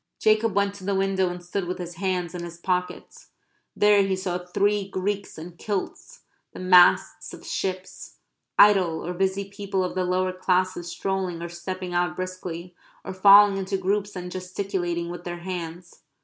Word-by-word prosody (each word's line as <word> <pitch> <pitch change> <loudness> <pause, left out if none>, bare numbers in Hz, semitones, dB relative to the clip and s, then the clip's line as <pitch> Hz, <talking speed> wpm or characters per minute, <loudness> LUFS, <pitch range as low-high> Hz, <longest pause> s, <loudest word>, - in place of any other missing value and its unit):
Jacob 215 -1 +2
went 200 0 +2
to 200 -1 -12
the 200 +1 -1
window 190 -1 +1
and 175 0 -7
stood 180 +1 -3
with 180 - -3
his 175 -1 -6
hands 185 -2 -2
in 175 -1 -5
his 170 -1 -8
pockets. 180 0 -3 0.5
There 205 -1 +5
he 195 -1 +1
saw 185 -1 -3
three 200 +3 0
Greeks 200 +1 -3
in 170 +2 -9
kilts; 210 - -5 0.3
the - - -9
masts 185 -1 +4
of - - -15
ships; 185 -1 -5 0.4
idle 190 -6 +5
or 175 - -3
busy 190 +2 -1
people 200 -1 -3
of 180 - -3
the 185 - -1
lower 185 +1 0
classes 185 -1 0
strolling 185 0 -2
or 170 - -5
stepping 180 +1 -6
out 175 -2 0
briskly, 185 -1 -6 0.3
or - - -5
falling 200 +1 +7
into 195 0 -2
groups 200 +2 -1
and 180 -1 -6
gesticulating 180 -2 -3
with 175 - -8
their 175 0 -6
hands. 175 -1 -7
185 Hz, 170 wpm, -25 LUFS, 175-195 Hz, 0.5 s, falling